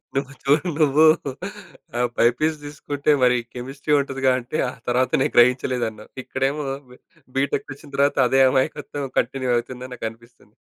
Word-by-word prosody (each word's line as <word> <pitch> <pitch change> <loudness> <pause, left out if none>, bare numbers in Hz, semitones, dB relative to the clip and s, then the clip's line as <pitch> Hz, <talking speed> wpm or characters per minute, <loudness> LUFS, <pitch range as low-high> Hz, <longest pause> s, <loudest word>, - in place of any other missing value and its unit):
నువ్వు 140 0 -2
చూడు 145 +5 +2
నువ్వు 155 +1 +5 0.9
ఆ - - 0 0.2
బైపీసీ 155 +7 +2
తీసుకుంటే 145 0 -2
మరి 125 0 +5 0.2
కెమిస్ట్రీ 135 +4 -3
ఉంటదిగా 135 -1 0
అంటే 125 +6 -5
ఆ - - -6 0.2
తర్వాత 125 +1 +1
నేను - - 0
గ్రహించలేదన్నావు. 120 -3 +2
ఇక్కడేమో 135 +3 -2 0.3
బి 125 - -14 0.4
బీటెక్‌కొచ్చిన 140 +1 -2
తర్వాత 140 +1 +2
అదే 135 +1 +4
అమాయకత్వం 140 +1 -1
కంటిన్యూ 130 -2 -1
అవుతుందని 125 +1 -6
నాకనిపిస్తుంది. 115 +1 -9
135 Hz, 130 wpm, -22 LUFS, 125-145 Hz, 0.9 s, నువ్వు